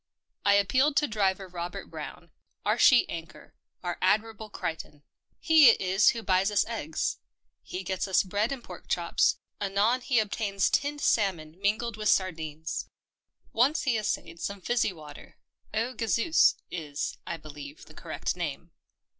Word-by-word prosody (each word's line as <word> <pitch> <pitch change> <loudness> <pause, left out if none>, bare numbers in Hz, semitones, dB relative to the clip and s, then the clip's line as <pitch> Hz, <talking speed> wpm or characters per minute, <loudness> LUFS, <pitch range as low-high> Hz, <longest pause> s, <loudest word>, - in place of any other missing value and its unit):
I 200 0 +5
appealed 255 +9 +3
to 295 - +3
Driver 195 -3 0
Robert 175 -1 -6
Brown, - - -8 0.3
our - - +1
sheet 255 -4 +7
anchor 165 -1 -9
— - - -46
our 175 -1 -3
Ad 190 +3 +4
mirable 220 -1 -10
Crichton. 150 -4 -5 0.4
He 315 -5 +7
it - - +4
is 190 +1 +4
who 230 -1 -2
buys 190 0 +2
us 210 - +2
eggs; 210 -9 -3 0.4
he 185 +1 -6
gets 190 +1 -2
us 190 - +3
bread 205 +5 -1
and 265 -3 -5
pork - - -11
chops; - - +1 0.2
anon 205 +5 +2
he 245 0 0
obtains 205 -2 +1
tinned 290 +1 0
salmon 170 -7 +1
mingled 215 +2 0
with 215 0 0
sardines. 160 -4 -1 0.6
Once 265 +7 +3
he 260 -4 +1
essayed 205 -6 -3
some 200 0 -4
fizzy 235 +2 +1
water 150 -4 -13 0.2
— - - -39
Eau 230 +4 0
Gazeuse 230 +7 +3 0.2
is, 150 -5 -4
I 170 - -3
believe, 150 -1 -10
the - - -15
correct - - -4
name. - - -5
200 Hz, 160 wpm, -28 LUFS, 175-230 Hz, 0.6 s, sheet